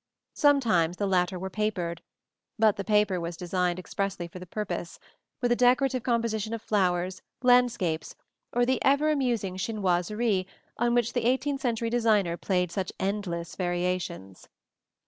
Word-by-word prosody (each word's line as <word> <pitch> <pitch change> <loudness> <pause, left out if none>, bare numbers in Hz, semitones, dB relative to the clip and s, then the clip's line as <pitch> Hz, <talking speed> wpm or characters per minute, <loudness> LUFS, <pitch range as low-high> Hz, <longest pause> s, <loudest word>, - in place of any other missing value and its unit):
Sometimes 220 - +3
the 205 - 0
latter 185 -1 +1
were 190 +1 -5
papered; 185 -6 -2 0.6
but 220 -2 +4
the 200 - -4
paper 210 -1 +3
used 180 - -1
was 170 0 -5
designed 180 0 -1
expressly 185 -1 -3
for 175 +2 -10
the 180 - -10
purpose, 190 -3 -4 0.4
with 245 -1 +1
a - - +5
decorative 255 +1 +3
composition 230 -2 -1
of 225 - -8
flowers, 185 -2 0 0.2
landscapes, 240 -10 +2 0.4
or 245 0 +2
the 260 +1 0
ever 285 +3 +3
amusing 235 -10 -1
chinoiseries 195 0 0 0.3
on 240 0 +2
which 240 0 +1
the 245 - -1
eighteenth 270 +3 +1
century 230 -3 -1
designer 215 -7 +2
played 180 -1 0
such 185 0 -3
endless 185 -4 -3
variations. 175 - -3
200 Hz, 145 wpm, -27 LUFS, 180-240 Hz, 0.6 s, a